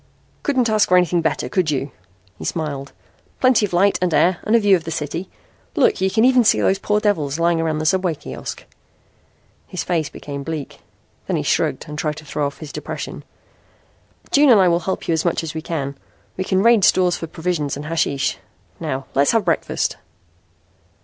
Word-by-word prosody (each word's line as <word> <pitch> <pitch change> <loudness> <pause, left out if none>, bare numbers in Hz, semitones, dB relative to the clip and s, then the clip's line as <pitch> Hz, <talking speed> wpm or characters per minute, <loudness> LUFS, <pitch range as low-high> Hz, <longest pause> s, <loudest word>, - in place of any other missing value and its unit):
"Couldn't 260 -4 +1
ask 215 -1 +2
for 180 - +6
anything 180 -1 +2
better, 160 -2 -1
could 185 -5 0
you?" 140 -1 -2 0.5
he - - -7
smiled. 145 -4 -3 0.5
"Plenty 255 -5 +4
of - - -17
light 195 +3 +3
and 180 -1 +1
air 175 +2 +3
and 215 - +2
a - - +6
view 205 -3 +5
of 170 - -2
the 165 - -6
city. 160 +3 -4 0.5
Look, 445 -3 +3
you 190 - +3
can 220 +4 +3
even 255 -1 +5
see 225 - +4
those 195 - +2
poor 210 +1 +1
devils 160 -10 0
lying 170 0 +2
around 160 -1 -1
the 155 - -3
subway 185 -1 +1
kiosk." - - -7 1.0
His 185 - -4
face 165 -4 -1
became 140 -1 -7
bleak. 155 -1 -6 0.5
Then - - 0
he - - -1
shrugged - - 0
and 150 0 -6
tried 150 -2 -1
to 155 - -11
throw 145 0 -1
off 140 - -8
his 155 -3 -9
depression. - - -6 1.1
"June 290 0 +5
and 225 -5 +7
I 185 -2 +5
will 170 0 +2
help 190 +1 -4
you 170 - +2
as 160 - 0
much 170 -1 0
as 160 - -5
we 160 - -4
can. 140 -4 -4 0.4
We 185 - -3
can 190 0 +1
raid 230 -3 +5
stores 180 -3 +4
for 165 - -6
provisions 160 -4 -2
and 145 - -7
hashish. 155 -4 -1 0.4
New 130 +1 -3
let's 140 +7 +3
have 225 -4 +2
breakfast." 170 - 0
170 Hz, 200 wpm, -20 LUFS, 155-195 Hz, 1.1 s, and